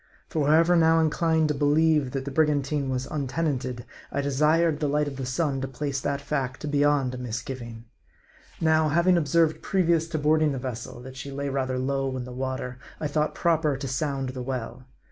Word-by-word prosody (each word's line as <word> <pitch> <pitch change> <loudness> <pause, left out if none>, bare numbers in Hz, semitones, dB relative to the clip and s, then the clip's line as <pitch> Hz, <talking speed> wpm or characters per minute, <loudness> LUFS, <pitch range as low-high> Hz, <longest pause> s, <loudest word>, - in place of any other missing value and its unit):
For 150 -3 0
however 165 +3 +5
now 165 -1 +5
inclined 160 0 +2
to - - +2
believe 150 0 +3
that 135 +1 -4
the 140 - -4
brigantine 145 -1 +1
was 130 0 -2
untenanted, 135 -4 -2 0.3
I 140 - -1
desired 150 +3 +2
the 150 - 0
light 150 +1 +1
of 135 -2 -6
the 130 -2 -4
sun 135 0 -1
to 135 - -2
place 135 +1 -3
that 140 -1 -2
fact 140 0 -3
beyond 145 -3 +2
a 125 - -6
misgiving. 120 -1 -6 0.7
Now, 160 -1 +3
having 170 +4 +4
observed, 160 0 +2
previous 170 -4 +1
to 165 -1 -3
boarding 155 0 +2
the - - -3
vessel, 120 -2 -6
that 130 +1 -10
she 135 +2 -6
lay 140 +1 -3
rather 130 -1 -1
low 135 0 -1
in 125 - -4
the 125 - -8
water, 130 -1 -4 0.2
I - - -3
thought 150 +1 0
proper 160 -4 +1
to 135 0 -5
sound 135 0 -2
the 130 0 -5
well. 125 0 -5
140 Hz, 190 wpm, -26 LUFS, 130-155 Hz, 0.7 s, however